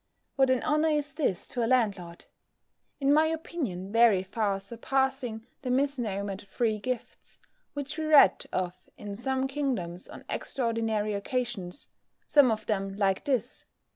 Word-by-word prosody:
What 270 -1 +4
an 255 -1 +2
honour 305 +1 +2
is 295 -2 0
this 275 - -1
to 245 - -1
a - - +1
landlord! 200 -9 0 0.7
In 280 0 +3
my 310 +1 +5
opinion 275 - -4
very 225 -4 +5
far 200 0 -1
surpassing 240 +2 -2 0.2
the 260 - -4
mis 275 +2 +1
nomer'd 200 -3 -3
free 220 +1 0
gifts 250 +1 -6 0.4
which 290 +2 -4
we 315 - -1
read 295 -11 +6
of 180 0 -3
in 205 -1 -6
some 265 +4 -1
kingdoms 250 -12 -3
on - - -11
extraordinary 225 -4 -1
occasions, 205 -3 -3 0.4
some 285 -4 +5
of 215 -1 -1
them 195 -2 -1
like 195 -2 +1
this! 255 -4 -2
235 Hz, 145 wpm, -28 LUFS, 200-270 Hz, 0.7 s, read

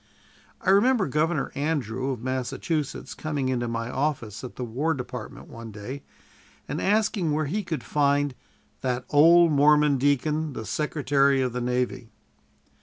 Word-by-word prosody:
I - - +2
remember 225 +2 +4
Governor 155 +2 0
Andrew, 135 -4 -2
of 125 -4 -4
Massachusetts, 130 +4 -3
coming 145 -4 -2
into 120 -2 -1
my 115 0 -3
office 130 -7 -2
at 125 - -8
the 125 - -5
War 140 +8 -1
Department 125 -3 -7
one 115 0 -9
day 110 +7 -7 0.7
and 145 - -3
asking 205 -5 +1
where 155 +1 0
he 200 +10 -1
could 165 -4 -4
find 145 -1 +1 0.5
"that 125 -1 -2
old 165 +3 +6
Mormon 150 -1 +4
deacon, 150 +2 +1
the 110 -2 -6
Secretary 140 - +1
of 125 -2 -2
the 125 - -3
Navy." 125 -1 -2
140 Hz, 145 wpm, -26 LUFS, 125-155 Hz, 0.7 s, old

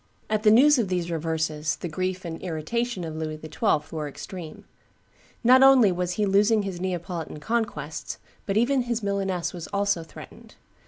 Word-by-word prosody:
At 215 -1 +1
the 215 - +5
news 265 +6 +6
of 225 - +1
these 175 -2 -2
reverses 160 -1 -1
the - - -6
grief 185 +3 -3
and 165 -1 -6
irritation 185 +6 -2
of 160 -1 -5
Louis 155 -1 -4
XII. 155 -1 0
were 155 -1 -3
extreme. 165 +3 -9 0.8
Not 255 +2 +7
only 265 -7 +7
was 180 0 -2
he 210 +2 0
losing 205 +2 +3
his 185 -3 -5
Neapolitan 175 -4 -4
conquests, 160 -6 -3 0.3
but 200 0 0
even 255 +4 +3
his 240 -1 -2
Milaness 195 -3 -1
was 175 -2 -7
also 200 -3 0
threatened. 160 - -13
185 Hz, 165 wpm, -25 LUFS, 160-215 Hz, 0.8 s, Not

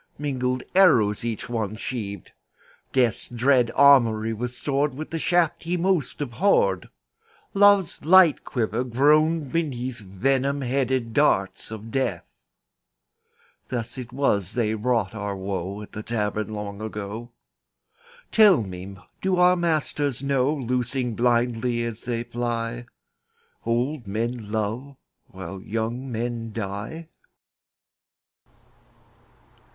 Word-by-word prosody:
Mingled 130 -3 -1
arrows 115 - +4
each 115 -2 -3
one 110 -4 -2
sheaved; 105 -5 -5 0.6
Death's 125 -5 +1
dread 125 0 +3
armoury 115 -6 +5
was 125 +2 -5
stored 140 -1 0
With 155 +3 -7
the 165 - -2
shafts 170 -1 +1
he 175 +2 0
most 175 -6 0
abhorred; 120 - +1 0.6
Love's 200 -3 +4
light 175 0 +6
quiver 115 -1 -1
groaned 150 +4 +3
beneath 130 -7 -2
Venom 135 +8 0
headed 130 -2 -1
darts 100 -10 +1
of 110 0 -8
Death. 110 -10 -1 1.4
Thus 120 +1 -4
it 125 -1 -7
was 105 -8 0
they 115 -3 0
wrought 110 -3 0
our 100 -2 -4
woe 95 +1 -4
At - - -13
the 110 - -6
Tavern 105 -2 -2
long 105 -1 -6
ago. 110 +2 -6 1.0
Tell 205 - +6
me, 95 0 -8 0.2
do 190 -1 +1
our 180 0 +5
masters 150 -6 -1
know, 140 0 +2
Loosing 125 -2 -1
blindly 120 0 +1
as 115 -1 -6
they 120 -1 -2
fly, 120 0 -3 0.8
Old 120 +2 -1
men 115 +1 -3
love 110 +6 -3 0.3
while 95 0 -8
young 115 +5 -3
men 115 0 -3
die? 105 +10 -5
120 Hz, 115 wpm, -24 LUFS, 110-140 Hz, 1.4 s, light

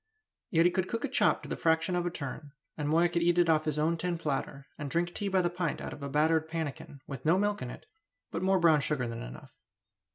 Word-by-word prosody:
Yet 165 -1 +4
he 175 - +5
could 185 +1 0
cook 230 - -2
a - - -1
chop - - +2
to - - -8
the - - -2
fraction 165 +2 +1
of 175 0 0
a - - +1
turn; 145 -2 -7 0.2
and 150 -1 -2
Moya 165 +3 +4
could 170 0 -1
eat 175 +1 +3
it 175 -1 +4
off 155 -1 +2
his 155 -1 -1
own 160 +2 +1
tin 175 0 -2
platter, 140 -3 -3
and 145 -1 -5
drink 175 +3 0
tea 205 - -2
by 190 -2 +2
the 175 - +2
pint 175 -3 -2
out - - -5
of 145 - -11
a 140 - -4
battered 160 +2 +2
pannikin, 155 -3 -5
with 135 -3 -7
no 165 +4 +4
milk 205 +1 0
in 125 - -4
it, - - -10 0.5
but 165 - -3
more 190 +1 +3
brown 160 -3 +5
sugar 140 -5 -1
than 115 0 -5
enough. - - -9
165 Hz, 260 wpm, -30 LUFS, 145-175 Hz, 0.5 s, he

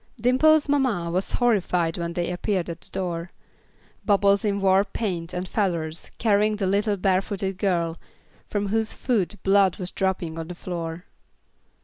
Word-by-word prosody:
Dimple's 290 +6 +4
mamma 250 -12 +1
was 185 +3 -1
horrified 180 -8 +1
when 170 -1 -3
they 175 0 -1
appeared 180 -1 -1
at 165 - -9
her - - -11
door. 175 -2 -3 0.7
Bubbles 200 -1 +3
in 200 -2 0
war 195 0 +4
paint 180 -6 -3
and 180 0 -4
feathers, 170 -7 -2
carrying 215 -1 +2
the 205 -2 -2
little 200 +2 +1
barefooted 195 0 0
girl, 170 -4 0 0.5
from 205 -1 -1
whose 220 +1 0
foot 210 -6 0
blood 195 -2 +4
was 180 -2 -4
dropping 180 -4 -2
on 165 - -5
the 180 - -7
floor. 170 0 -5
190 Hz, 150 wpm, -24 LUFS, 175-205 Hz, 0.7 s, Dimple's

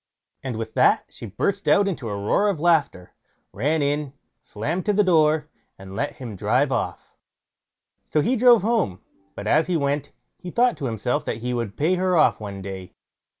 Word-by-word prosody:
And 130 -4 -4
with 110 0 -5
that - - +3
she 115 - -10
burst 195 - -2
out 200 0 +4
into 140 - -3
a 100 - -3
roar 110 - +1
of 190 -7 -2
laughter, 150 - +1 0.4
ran 145 +7 0
in, 145 -1 -1 0.3
slammed 155 - -4
to 210 - +3
the 210 +1 +3
door, 155 -4 +3 0.3
and 95 0 -10
let 145 - -2
him 120 -6 -8
drive - - +1
off. - - -3 0.9
So 150 - +1
he 240 - +1
drove 240 -3 +5
home; 215 - 0 0.3
but 100 - -7
as 155 +9 +3
he 180 -2 +1
went, 145 -1 -1 0.3
he 180 - -8
thought 240 +5 +2
to 140 - -5
himself 115 0 -1
that - - -3
he 125 - -1
would 115 -4 -4
pay 160 +5 +2
her 185 -1 +1
off 155 - +4
one 100 -2 -7
day. 95 -1 -8
145 Hz, 190 wpm, -23 LUFS, 110-180 Hz, 0.9 s, drove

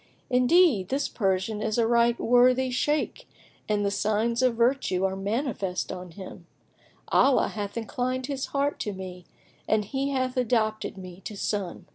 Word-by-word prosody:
Indeed, 250 - +4
this 275 +2 0
Persian 195 +1 -1
is 215 0 -1
a 230 - +3
right 235 0 +3
worthy 250 +2 +4
Shaykh 295 +4 -1 0.4
and 205 -1 +1
the 200 - +1
signs 215 +4 0
of 255 -2 +3
virtue 235 -6 +1
are 190 0 -1
manifest 200 -2 -2
on 180 0 -7
him; 180 -1 -11 0.6
Allah 275 -1 +4
hath 205 0 -5
inclined 255 +3 -2
his 275 -1 -3
heart 280 +1 -1
to 210 - -3
me 185 -2 -8 0.4
and 215 -1 +2
he 270 +6 -2
hath 255 -2 -1
adopted 215 -4 0
me 185 -1 -10
to 210 - -6
son." 200 -3 -3
225 Hz, 155 wpm, -26 LUFS, 195-255 Hz, 0.6 s, Indeed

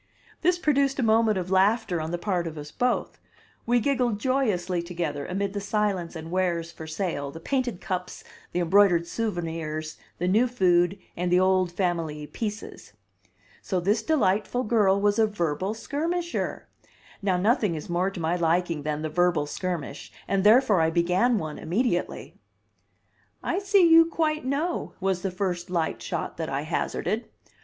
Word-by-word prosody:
This 355 +1 +3
produced 280 -4 +1
a 265 - 0
moment 220 -1 +3
of 185 0 -4
laughter 195 -2 +2
on 155 - -4
the 175 - -2
part 175 -2 -1
of 160 -1 -7
us 150 0 -8
both; 250 0 -1 0.5
we 240 +1 +4
giggled 245 -4 0
joyously 205 -9 0
together 165 -5 -4
amid 195 +1 -2
the 200 - -3
silence 200 -4 -1
and 160 0 -7
wares 175 -2 0
for 160 -1 -9
sale, 160 -3 -3
the 160 - -9
painted 250 0 -1
cups, 180 -1 -4 0.3
the 180 - -1
embroidered 175 -1 +4
souvenirs, 165 -7 -3 0.2
the 180 - -1
new 220 +7 +4
food, 180 -5 +2 0.2
and 175 0 -2
the 180 - +5
old 185 -1 +2
family 165 -5 -2
"pieces." 210 +8 -6 0.7
So 185 - -1
this 205 +5 +1
delightful 220 -3 +1
girl 210 -4 +3
was 205 +2 +2
a 220 - +5
verbal 185 0 -2
skirmisher! 335 +8 -3 0.5
Now 190 -3 +1
nothing 210 - +2
is 155 - -6
more 175 +2 0
to 195 - -8
my 165 +1 0
liking 170 -1 +1
than 150 +1 -3
the - - 0
verbal 175 -1 +1
skirmish, 155 -3 -5 0.2
and 195 -1 +1
therefore 215 -3 +5
I 160 - +3
began 180 +8 +2
one 155 -5 -5
immediately. 180 +2 -1 1.1
"I 365 - 0
see 395 -3 +4
you 330 0 +8
quite 310 -3 -1
know," 300 +6 -2
was 190 -1 0
the 195 - -1
first 180 -1 -3
light 170 -3 -1
shot - - -4
that - - -3
I - - -2
hazarded. - - -2
185 Hz, 165 wpm, -26 LUFS, 170-225 Hz, 1.1 s, you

